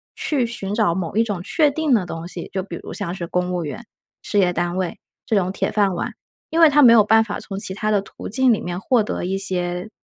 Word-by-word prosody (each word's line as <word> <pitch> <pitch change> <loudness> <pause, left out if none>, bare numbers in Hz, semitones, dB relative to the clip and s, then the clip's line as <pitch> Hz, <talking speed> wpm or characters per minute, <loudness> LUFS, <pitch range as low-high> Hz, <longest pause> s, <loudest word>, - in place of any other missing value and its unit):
去 270 -6 0
寻 205 -4 -4
找 210 -7 +2
某 180 -1 -4
一 225 - +5
种 200 -5 -4
确 300 - +2
定 310 -1 0
的 210 -6 +2
东 165 -1 -6
西， 175 -1 -7
就 190 - -1
比 175 -3 -7
如 - - -8
像 170 - -4
是 175 -2 -5
公 180 +1 -1
务 175 -2 -2
员、 225 +10 -7 0.4
事 205 - 0
业 180 -2 +3
单 175 +1 -2
位 185 -2 -2 0.3
这 220 - 0
种 185 -2 +1
铁 - - -1
饭 200 -3 +2
碗。 - - -3 0.4
因 330 +1 +2
为 320 - +9
他 295 +1 +4
没 240 -4 +8
有 220 -2 +7
办 220 +2 +5
法 205 -2 -5
从 195 -1 -6
其 190 - -2
它 215 +1 -1
的 205 -2 +2
途 195 - -9
径 260 +2 +4
里 215 - -2
面 175 0 -4
获 230 +3 +2
得 205 - -3
一 190 +2 -1
些 180 0 -2
195 Hz, 280 characters per minute, -21 LUFS, 180-225 Hz, 0.4 s, 为